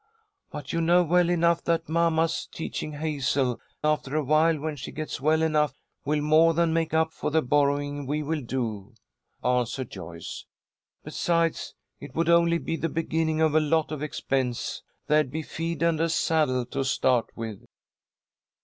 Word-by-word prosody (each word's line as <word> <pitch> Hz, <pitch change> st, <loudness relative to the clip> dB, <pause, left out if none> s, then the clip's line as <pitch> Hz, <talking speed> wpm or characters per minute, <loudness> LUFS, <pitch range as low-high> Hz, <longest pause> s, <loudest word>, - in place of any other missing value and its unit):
"But 145 Hz, -2 st, -7 dB
you 165 Hz, -, +1 dB
know 175 Hz, +2 st, +4 dB
well 175 Hz, +1 st, +3 dB
enough 170 Hz, -1 st, +2 dB
that 165 Hz, -1 st, 0 dB
mamma's 165 Hz, 0 st, +1 dB
teaching 155 Hz, -1 st, -5 dB
Hazel, 140 Hz, -4 st, -1 dB, 0.2 s
after 150 Hz, -2 st, 0 dB
awhile 155 Hz, +2 st, +3 dB
when 155 Hz, +1 st, -3 dB
she 130 Hz, -2 st, -7 dB
gets 155 Hz, -3 st, -5 dB
well 155 Hz, +2 st, +3 dB
enough, 150 Hz, -4 st, +1 dB, 0.3 s
will 150 Hz, +1 st, +1 dB
more 155 Hz, +2 st, +4 dB
than 170 Hz, -1 st, +2 dB
make 165 Hz, -1 st, 0 dB
up 160 Hz, 0 st, +1 dB
for -, -, -3 dB
the 160 Hz, +1 st, +2 dB
borrowing 145 Hz, +1 st, +1 dB
we 150 Hz, +2 st, -1 dB
will 155 Hz, +1 st, -2 dB
do," 115 Hz, -4 st, -4 dB, 0.5 s
answered 125 Hz, 0 st, 0 dB
Joyce. 85 Hz, -3 st, -8 dB, 0.6 s
"Besides 165 Hz, -1 st, -1 dB, 0.2 s
it 145 Hz, -2 st, -11 dB
would 165 Hz, 0 st, +1 dB
only 170 Hz, 0 st, +4 dB
be 165 Hz, 0 st, -3 dB
the 165 Hz, -, -2 dB
beginning 160 Hz, 0 st, -1 dB
of 160 Hz, -2 st, +3 dB
a 155 Hz, -, +5 dB
lot 155 Hz, 0 st, +1 dB
of 150 Hz, -2 st, -4 dB
expense. 130 Hz, -4 st, -2 dB, 0.2 s
There'd 150 Hz, -2 st, +2 dB
be 160 Hz, +4 st, -4 dB
feed 165 Hz, 0 st, -3 dB
and 165 Hz, -2 st, +2 dB
a 165 Hz, -, +2 dB
saddle 155 Hz, -6 st, +1 dB
to 135 Hz, +3 st, -3 dB
start 130 Hz, -2 st, +2 dB
with." 110 Hz, -3 st, -6 dB
155 Hz, 160 wpm, -26 LUFS, 135-165 Hz, 0.6 s, a